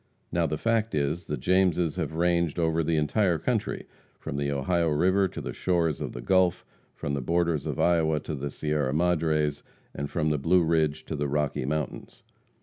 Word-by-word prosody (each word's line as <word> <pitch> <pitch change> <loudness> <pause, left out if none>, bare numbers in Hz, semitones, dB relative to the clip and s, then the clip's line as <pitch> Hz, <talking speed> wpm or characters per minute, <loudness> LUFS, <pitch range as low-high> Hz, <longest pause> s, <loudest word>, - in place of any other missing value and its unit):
Now 85 -1 +1
the 75 - -2
fact 115 +1 0
is, 75 +4 -1
the 75 - -2
Jameses 90 -4 +2
have 80 -4 -3
ranged 85 -1 +1
over 80 -1 +1
the 80 0 0
entire 85 +4 +2
country, - - -2 0.3
from - - -6
the 70 0 -1
Ohio 85 +5 +1
river 95 +6 +3
to - - -7
the - - -5
shores 85 -4 0
of - - -4
the - - -6
Gulf; 90 +3 +2 0.3
from 70 - -4
the 70 - -1
borders 85 +1 0
of 75 - -3
Iowa 80 -3 +3
to 80 - -5
the 70 0 -3
Sierra 75 -2 -1
Madres, 80 -3 +1 0.3
and 70 0 -4
from 80 -3 0
the 75 - 0
Blue 85 +5 +3
Ridge 80 -2 +1
to 80 - -4
the 75 0 -1
Rocky 75 -2 -1
Mountains. 75 +1 -4
80 Hz, 190 wpm, -27 LUFS, 75-85 Hz, 0.3 s, river